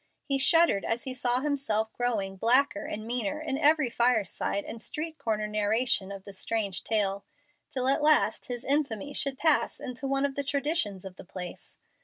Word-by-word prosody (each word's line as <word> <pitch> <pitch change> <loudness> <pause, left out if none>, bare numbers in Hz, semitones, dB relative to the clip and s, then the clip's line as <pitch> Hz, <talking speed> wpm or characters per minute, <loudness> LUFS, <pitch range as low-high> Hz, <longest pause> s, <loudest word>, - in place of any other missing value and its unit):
He 275 -1 +2
shuddered 330 - +4
as 230 +1 -2
he 260 - -4
saw 250 0 0
himself 260 -7 -1
growing 215 -6 -1
blacker 240 +2 +2
and 215 +1 -5
meaner 240 +3 -1
in 295 -3 -3
every 300 -4 +4
fireside 220 -4 0
and 225 - -7
street 315 +4 -4
corner 215 -2 -1
narration 210 0 +1
of 195 -1 -8
the 200 - -10
strange 200 -1 -2
tale, 200 -2 0 0.5
till 255 -1 -1
at 275 +3 +4
last 305 0 +3
his 245 -1 -5
infamy 285 -2 0
should 275 -1 0
pass 315 0 +2
into 255 +2 -5
one 275 +1 +1
of 280 - -2
the 280 - -2
traditions 280 - -1
of 190 -1 -9
the - - -10
place. 180 -1 -8
245 Hz, 180 wpm, -28 LUFS, 210-280 Hz, 0.5 s, shuddered